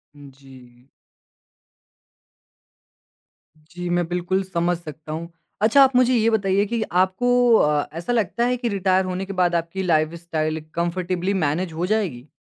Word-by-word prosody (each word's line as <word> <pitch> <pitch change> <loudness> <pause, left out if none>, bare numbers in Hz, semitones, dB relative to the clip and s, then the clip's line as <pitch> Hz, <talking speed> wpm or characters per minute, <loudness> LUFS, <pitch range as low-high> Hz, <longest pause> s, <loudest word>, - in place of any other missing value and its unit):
जी। 130 -3 -16 2.7
जी, 175 +3 -8
मैं 175 0 +1
बिल्कुल 180 +2 -1
समझ 175 -1 -1
सकता 155 -2 -10
हूँ। 165 +2 -6 0.3
अच्छा, 225 +6 +5
आप 265 -1 +2
मुझे 255 0 +4
ये 225 0 +3
बताइए 200 -2 +1
कि 230 +1 -2
आपको 235 +7 +3
अ, 150 -7 +2
ऐसा 170 +8 -3
लगता 230 +1 0
है 250 0 0
कि 240 -1 -2
रिटायर 190 -2 +1
होने 185 +1 -3
के 195 - -6
बाद 180 -2 +1
आपकी 170 +3 -2
लाइफ़स्टाइल 160 -1 -1
कम्फ़र्टेबली 180 +2 -1
मैनेज 165 0 -1
हो 165 +3 -2
जाएगी? 180 - -2
180 Hz, 140 wpm, -22 LUFS, 160-200 Hz, 2.7 s, अच्छा